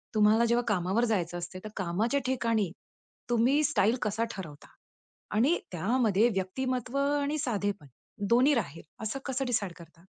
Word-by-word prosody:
तुम्हाला 215 Hz, +2 st, +5 dB
जेव्हा 235 Hz, +1 st, +2 dB
कामावर 190 Hz, +5 st, +1 dB
जायचं 175 Hz, -4 st, -1 dB
असते, 175 Hz, +2 st, -6 dB
तर 215 Hz, -, -6 dB
कामाच्या 205 Hz, +9 st, 0 dB
ठिकाणी 230 Hz, -7 st, 0 dB, 0.6 s
तुम्ही 245 Hz, +6 st, +3 dB
स्टाईल 240 Hz, -7 st, +3 dB
कसा 215 Hz, +2 st, 0 dB
ठरवता 155 Hz, -8 st, -9 dB, 0.7 s
आणि 275 Hz, +11 st, +3 dB
त्यामध्ये 220 Hz, +4 st, +2 dB
व्यक्तिमत्व 245 Hz, +6 st, -2 dB
आणि 285 Hz, +1 st, +1 dB
साधेपण 205 Hz, -, -2 dB, 0.4 s
दोन्ही 255 Hz, +5 st, +5 dB
राहील, 165 Hz, -, -3 dB, 0.2 s
असं 220 Hz, +5 st, -3 dB
कसं 270 Hz, 0 st, -1 dB
डिसाईड 215 Hz, -7 st, -1 dB
करता? 170 Hz, -1 st, -16 dB
225 Hz, 135 wpm, -29 LUFS, 190-255 Hz, 0.7 s, तुम्हाला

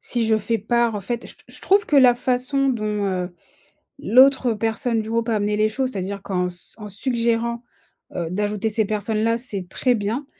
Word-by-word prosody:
si 235 Hz, -2 st, -1 dB
je 220 Hz, 0 st, +3 dB
fais 225 Hz, +2 st, -1 dB
part 235 Hz, +1 st, +1 dB
en 205 Hz, -, -3 dB
fait, 235 Hz, +4 st, -4 dB
je -, -, -8 dB
t -, -, -23 dB
je -, -, -12 dB
trouve 405 Hz, +3 st, +3 dB
que 295 Hz, -, +2 dB
la 250 Hz, -3 st, +7 dB
façon 255 Hz, +3 st, 0 dB
dont, 210 Hz, -4 st, -1 dB
heu, 180 Hz, -1 st, -2 dB, 0.7 s
l'autre 260 Hz, 0 st, +4 dB
personne 225 Hz, +1 st, -1 dB
du 220 Hz, -, -7 dB
groupe 230 Hz, +1 st, -1 dB
a 220 Hz, -, +1 dB
amené 210 Hz, 0 st, 0 dB
les 215 Hz, 0 st, +2 dB
choses, 260 Hz, +3 st, -2 dB
c'est-à-dire 195 Hz, 0 st, -4 dB
qu'en 180 Hz, -2 st, -1 dB
s 175 Hz, 0 st, -7 dB
en 210 Hz, -2 st, -8 dB
suggérant, 235 Hz, +2 st, -1 dB, 0.5 s
heu, 170 Hz, -2 st, -2 dB
d'ajouter 210 Hz, +3 st, -1 dB
ces 215 Hz, 0 st, +1 dB
personnes-là, 215 Hz, +2 st, 0 dB
c'est 200 Hz, -7 st, -4 dB
très 250 Hz, +5 st, +1 dB
bien. 225 Hz, +6 st, -3 dB
225 Hz, 200 wpm, -22 LUFS, 205-245 Hz, 0.7 s, la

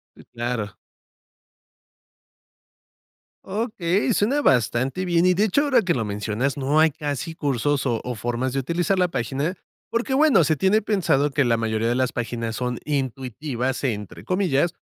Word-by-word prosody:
Sí, -, -, -16 dB
claro. 120 Hz, -4 st, -3 dB, 2.7 s
Okey, 205 Hz, 0 st, 0 dB
suena 265 Hz, +10 st, +1 dB
bastante 130 Hz, -, +1 dB
bien. 175 Hz, -1 st, +2 dB
Y, 185 Hz, 0 st, +4 dB
de 205 Hz, +4 st, +2 dB
hecho, 250 Hz, +8 st, +2 dB
ahora 265 Hz, -5 st, +3 dB
que 180 Hz, -2 st, +1 dB
lo 115 Hz, -, -1 dB
mencionas, 105 Hz, +6 st, -2 dB
no 140 Hz, +3 st, +2 dB
hay 160 Hz, 0 st, +5 dB
casi 145 Hz, +2 st, -4 dB
cursos 140 Hz, -1 st, 0 dB
o 115 Hz, -3 st, 0 dB
o 125 Hz, -, -4 dB
formas 120 Hz, +4 st, -2 dB
de 135 Hz, -, -1 dB
utilizar 175 Hz, +7 st, 0 dB
la 180 Hz, -1 st, +3 dB
página, 140 Hz, +5 st, -2 dB, 0.4 s
porque, 240 Hz, +3 st, -1 dB
bueno, 290 Hz, -, +5 dB
se 155 Hz, +2 st, +1 dB
tiene 195 Hz, +7 st, +3 dB
pensado 165 Hz, -9 st, +1 dB
que 140 Hz, 0 st, +1 dB
la 115 Hz, -1 st, +2 dB
mayoría 110 Hz, 0 st, -1 dB
de 120 Hz, -, +1 dB
las 130 Hz, 0 st, 0 dB
páginas 115 Hz, -2 st, -3 dB
son 125 Hz, -1 st, -2 dB
"intuitivas", 130 Hz, -1 st, -3 dB
entre 105 Hz, -7 st, -4 dB
comillas, 175 Hz, -1 st, +1 dB
140 Hz, 155 wpm, -23 LUFS, 120-180 Hz, 2.7 s, hay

